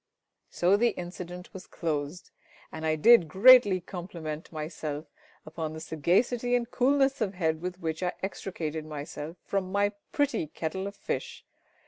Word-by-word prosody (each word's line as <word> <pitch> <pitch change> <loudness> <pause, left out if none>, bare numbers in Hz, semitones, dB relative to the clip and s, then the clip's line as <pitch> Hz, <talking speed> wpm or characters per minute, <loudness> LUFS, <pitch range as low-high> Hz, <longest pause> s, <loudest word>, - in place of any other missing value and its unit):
So 185 +3 +3
the 235 +2 +2
incident 180 0 -7
was 190 -1 -9
closed, 155 +1 -4 0.4
and 160 0 -4
I 155 - +2
did 225 +2 +6
greatly 205 +2 +7
compliment 170 -4 -7
myself 155 -1 -5 0.4
upon 155 0 -5
the 160 - -7
sagacity 210 - +1
and 240 -1 -1
coolness 270 +1 +2
of 200 -3 -1
head 160 -3 0
with 180 0 -5
which 160 -2 -3
I 180 -1 0
extricated 160 -5 -4
myself 155 +2 -7
from 190 -2 -2
my 200 +1 +2 0.2
pretty 285 - 0
kettle 170 +6 -4
of 200 - -7
fish. - - -5
180 Hz, 145 wpm, -28 LUFS, 160-200 Hz, 0.4 s, greatly